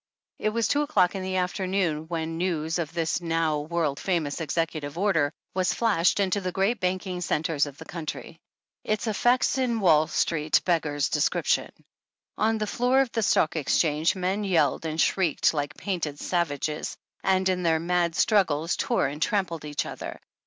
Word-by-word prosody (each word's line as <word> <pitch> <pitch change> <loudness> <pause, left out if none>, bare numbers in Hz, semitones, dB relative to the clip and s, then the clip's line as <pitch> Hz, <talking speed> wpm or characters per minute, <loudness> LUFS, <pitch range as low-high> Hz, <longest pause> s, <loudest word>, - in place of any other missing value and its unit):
It 215 - +1
was 225 0 0
two 290 - +2
o'clock 190 -11 +2
in 195 - -4
the 185 0 -3
afternoon 180 -3 -1
when 165 -1 -3
news 165 -2 -1
of 160 -2 -3
this 165 +1 -1
now 165 -2 0
world 155 -2 -1
famous 165 -6 -1
Executive 160 -1 -2
Order 175 -7 +2 0.2
was 185 -1 +1
flashed 205 -6 +2
into 200 0 +1
the 185 -1 -2
great 195 +5 0
banking 185 0 -2
centres 155 -3 0
of 140 -1 -10
the 160 - -10
country. 165 0 -7 0.4
Its 215 +1 -1
effect 240 +4 +2
in 240 -3 0
Wall 155 -6 +4
street 155 -2 +1
beggars 150 -5 +1
description. 150 -2 +1 0.7
On 220 +1 +1
the 215 - -1
floor 245 +5 +2
of 260 -3 -1
the 225 - -1
Stock 165 -6 +2
Exchange 155 +1 +1
men 190 +3 -1
yelled 165 -6 +1
and 160 0 -4
shrieked 170 -5 +2
like 145 -1 -3
painted 165 -7 -3
savages, 155 -3 -2 0.3
and, 190 0 +2
in 185 -1 +1
their 165 -2 +2
mad 170 0 0
struggles, 165 -6 +2
tore 240 - 0
and 145 +3 -4
trampled 170 -5 -1
each 145 -1 -2
other. - - -7
170 Hz, 165 wpm, -26 LUFS, 155-195 Hz, 0.7 s, Wall